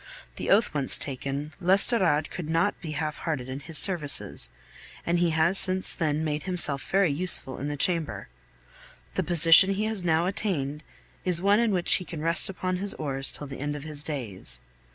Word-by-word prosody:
The -, -, -5 dB
oath 220 Hz, +4 st, +3 dB
once 140 Hz, -3 st, +1 dB
taken, 140 Hz, +2 st, -5 dB
l'Estorade 185 Hz, -4 st, +2 dB
could 165 Hz, -3 st, -7 dB
not 165 Hz, +5 st, 0 dB
be 155 Hz, -3 st, -6 dB
half 155 Hz, 0 st, -4 dB
hearted 145 Hz, -7 st, -4 dB
in 130 Hz, +1 st, -6 dB
his 155 Hz, +2 st, -2 dB
services, 155 Hz, -, 0 dB, 0.6 s
and 170 Hz, +1 st, 0 dB
he 175 Hz, -1 st, +2 dB
has 165 Hz, +4 st, +3 dB
since 185 Hz, 0 st, +2 dB
then 155 Hz, -3 st, -1 dB
made 150 Hz, -1 st, -2 dB
himself 170 Hz, -7 st, +1 dB
very 195 Hz, -4 st, +2 dB
useful 145 Hz, -4 st, +2 dB
in 140 Hz, -, -4 dB
the 145 Hz, 0 st, -4 dB
Chamber. 150 Hz, -, -2 dB, 0.9 s
The -, -, -1 dB
position 175 Hz, +3 st, +6 dB
he 210 Hz, -, -2 dB
has 215 Hz, -4 st, -1 dB
now 165 Hz, 0 st, +1 dB
attained 160 Hz, -7 st, -3 dB, 0.4 s
is 180 Hz, -2 st, +2 dB
one 200 Hz, +3 st, +3 dB
in 235 Hz, -2 st, +1 dB
which 180 Hz, -3 st, +2 dB
he 185 Hz, -, -8 dB
can 165 Hz, -3 st, -8 dB
rest 165 Hz, +3 st, +2 dB
upon 185 Hz, -1 st, -3 dB
his 200 Hz, +2 st, -2 dB
oars 135 Hz, -3 st, -1 dB
till 145 Hz, -, -6 dB
the 135 Hz, -1 st, -9 dB
end 145 Hz, +1 st, -3 dB
of 145 Hz, -, -8 dB
his 150 Hz, -1 st, -2 dB
days. 115 Hz, -, -6 dB
160 Hz, 190 wpm, -26 LUFS, 145-185 Hz, 0.9 s, position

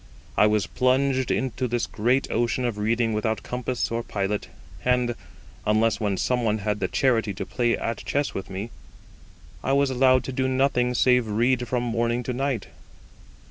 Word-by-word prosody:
I 105 Hz, -, +5 dB
was 105 Hz, -3 st, +2 dB
plunged 130 Hz, 0 st, +1 dB
into 130 Hz, 0 st, -1 dB
this 120 Hz, 0 st, -1 dB
great 125 Hz, +5 st, +1 dB
ocean 120 Hz, +2 st, 0 dB
of 115 Hz, -4 st, -2 dB
reading 115 Hz, +1 st, +1 dB
without 110 Hz, +1 st, -1 dB
compass 125 Hz, -1 st, -2 dB
or 115 Hz, 0 st, -1 dB
pilot; 100 Hz, -2 st, -2 dB, 0.4 s
and, 125 Hz, -1 st, +2 dB, 0.5 s
unless 110 Hz, 0 st, +2 dB
when 100 Hz, -3 st, 0 dB
some 125 Hz, +3 st, 0 dB
one 110 Hz, -1 st, +1 dB
had 105 Hz, 0 st, -2 dB
the 95 Hz, -, 0 dB
charity 115 Hz, -6 st, +1 dB
to -, -, -4 dB
play 120 Hz, -2 st, 0 dB
at 115 Hz, -2 st, -3 dB
chess 145 Hz, 0 st, -1 dB
with 95 Hz, -, -5 dB
me, 100 Hz, +4 st, -5 dB, 0.9 s
I 135 Hz, -, +1 dB
was 140 Hz, -1 st, +3 dB
allowed 130 Hz, 0 st, +4 dB
to 130 Hz, -, -5 dB
do 130 Hz, +1 st, 0 dB
nothing 130 Hz, -2 st, +1 dB
save 125 Hz, -1 st, +3 dB
read 120 Hz, +3 st, +1 dB
from 125 Hz, -1 st, -1 dB
morning 120 Hz, +1 st, 0 dB
to 125 Hz, -, -3 dB
night. 130 Hz, -4 st, -1 dB
120 Hz, 175 wpm, -25 LUFS, 110-130 Hz, 0.9 s, I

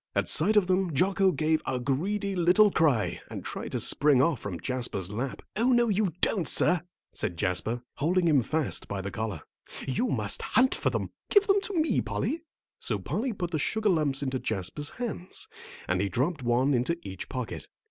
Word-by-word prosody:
At -, -, +1 dB
sight 205 Hz, +8 st, +4 dB
of 205 Hz, -, +5 dB
them 185 Hz, -3 st, 0 dB
Jocko 190 Hz, +4 st, +3 dB
gave 155 Hz, 0 st, +1 dB
a 130 Hz, -1 st, -2 dB
greedy 195 Hz, +11 st, -1 dB
little 185 Hz, +4 st, +5 dB
cry 145 Hz, -, +1 dB
and -, -, -7 dB
tried -, -, -6 dB
to -, -, 0 dB
spring 145 Hz, -3 st, +3 dB
off 145 Hz, -2 st, +2 dB
from 95 Hz, -6 st, -5 dB
Jasper's 120 Hz, -8 st, -2 dB
lap. 125 Hz, +5 st, -4 dB
"Oh, 235 Hz, +5 st, +2 dB
no 240 Hz, -2 st, +3 dB
you 205 Hz, -2 st, +1 dB
don't, 190 Hz, -7 st, +2 dB
sir," 180 Hz, -2 st, +5 dB, 0.3 s
said 85 Hz, -, -3 dB
Jasper, 105 Hz, +6 st, 0 dB
holding 170 Hz, +5 st, +2 dB
him 145 Hz, -5 st, +4 dB
fast 155 Hz, +5 st, -2 dB
by 100 Hz, -, -4 dB
the 100 Hz, +1 st, -4 dB
collar; 105 Hz, -4 st, -4 dB, 0.5 s
"you 135 Hz, -, 0 dB
must -, -, 0 dB
hunt 260 Hz, +1 st, +3 dB
for -, -, 0 dB
them. -, -, -3 dB, 0.2 s
Give 410 Hz, -1 st, +5 dB
them 395 Hz, 0 st, +3 dB
to 405 Hz, -, -4 dB
me, 315 Hz, -, +2 dB
Polly." 325 Hz, +2 st, -2 dB, 0.4 s
So -, -, 0 dB
Polly 250 Hz, +3 st, -2 dB
put 180 Hz, -5 st, -4 dB
the 155 Hz, -, -1 dB
sugar 220 Hz, +7 st, 0 dB
lumps 150 Hz, -6 st, +1 dB
into 130 Hz, -1 st, -2 dB
Jasper's 110 Hz, +9 st, -2 dB
hands, 225 Hz, -7 st, -5 dB, 0.4 s
and 90 Hz, 0 st, +1 dB
he 100 Hz, -, 0 dB
dropped 145 Hz, -, -1 dB
one 125 Hz, +3 st, +2 dB
into 130 Hz, +7 st, 0 dB
each 95 Hz, -1 st, -7 dB
pocket. 125 Hz, -3 st, -5 dB
155 Hz, 190 wpm, -28 LUFS, 125-195 Hz, 0.5 s, of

